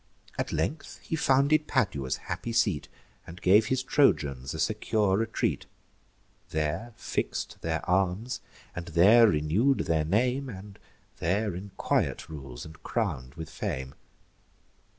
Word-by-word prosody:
At - - -2
length 80 - -2
he - - -2
founded 150 +1 +3
Padua's 70 - 0
happy 115 - -4
seat, 100 - +1 0.4
And 85 +2 -9
gave 105 +2 +5
his 130 0 0
Trojans 70 - +2
a - - -5
secure 105 -1 +1
retreat; 115 +2 -1 0.8
There 80 +10 -2
fix'd - - -3
their 80 -1 -2
arms, 95 +7 0 0.3
and 85 0 -5
there 100 +8 +7
renew'd 100 - +2
their 80 -1 +1
name, 125 - +1
And 100 -2 -10 0.4
there 100 +4 0
in 95 +3 -7
quiet - - 0
rules, 65 -5 -8
and 80 +1 -12
crown'd 70 - -2
with 80 0 -7
fame. 65 -2 -4
95 Hz, 130 wpm, -28 LUFS, 80-115 Hz, 0.8 s, there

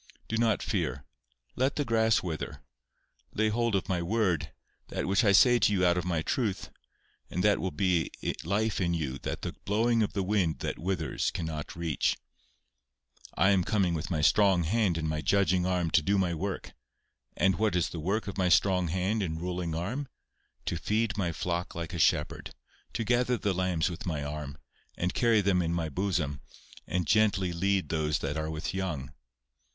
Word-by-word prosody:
Do 115 - -2
not 115 -2 +2
fear. 65 - -2 0.5
Let 130 +2 +1
the 145 - 0
grass 110 -2 +3
wither. 80 -5 -5 0.7
Lay 110 0 +2
hold 115 0 +1
of 95 - -1
my 90 -2 0
word, 85 -6 0 0.4
that - - -3
which 100 +5 +2
I 100 - +5
say 120 +5 +6
to - - +3
you 95 -3 +2
out 85 0 +4
of 90 -1 -2
my 85 -3 0
truth, 110 -3 -2 0.6
and 90 - -2
that 105 0 +4
will 95 - -1
be 90 -4 +1 0.3
life 105 +4 0
in 85 -1 +1
you 70 -5 -3
that - - -5
the - - -3
blowing 115 +3 +2
of 105 - 0
the 100 - -1
wind 95 -5 +1
that - - -3
withers 85 -3 -1
cannot 80 -3 -5
reach. 85 -3 0 1.2
I 95 - +4
am 95 -2 +3
coming 95 -3 +1
with 80 0 -3
my 80 -4 0
strong 95 +1 +4
hand 95 0 +1
and 80 -1 -2
my 80 0 -2
judging 95 -1 +2
arm 90 -3 0
to 85 - +4
do 100 +6 +1
my 90 -3 +1
work. 95 +4 -4 0.6
And 95 -1 +2
what 110 -4 +2
is 90 - +1
the 85 - -6
work 100 +8 -1
of 100 - -5
my 90 -1 +2
strong 90 0 +3
hand 95 +6 0
and 80 -4 -2
ruling 90 -1 -3
arm? 120 - -3 0.6
To 85 - -1
feed 110 +5 0
my 90 -4 0
flock 85 +1 -3
like 85 +1 -5
a 85 - -3
shepherd, - - +1 0.4
to 115 - -1
gather 120 +2 +2
the 100 -3 0
lambs 90 -3 0
with 90 0 -5
my 75 -4 -2
arm, 75 -1 -5 0.4
and 90 +1 -1
carry 115 -3 +3
them 95 -2 +2
in 85 0 -1
my 80 -2 -1
bosom, 80 -4 -1 0.5
and 90 -1 -1
gently 95 0 +2
lead 95 +2 0
those 75 -1 0
that 75 0 -3
are 80 0 -2
with 80 +1 -4
young. 80 -8 -3
90 Hz, 190 wpm, -29 LUFS, 80-105 Hz, 1.2 s, say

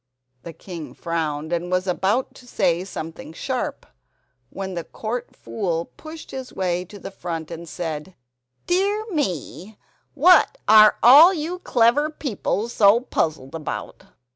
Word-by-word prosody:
The 170 - -9
king 165 -1 -9
frowned, 160 -2 -3
and 175 +1 -2
was 185 0 0
about 195 +7 0
to 250 - -16
say 180 -6 0
something 165 -4 -8
sharp, - - -4 0.6
when 190 +4 -6
the 170 -2 -4
Court 230 +7 -6
Fool 170 -6 -3
pushed 315 0 -10
his 260 -1 -7
way 180 -1 -2
to 205 +3 -12
the 195 0 -8
front 165 -4 -6
and 170 0 -8
said: 160 +1 -5 0.5
"Dear 400 +4 +1
me, 205 - -3 0.4
what 360 - +5
are 215 0 +7
all 305 +10 +9
you 335 +3 -4
clever 250 +2 +2
people 235 -7 -3
so 215 -1 +4
puzzled 155 - -2
about? 160 -2 -6
195 Hz, 140 wpm, -22 LUFS, 170-255 Hz, 0.6 s, all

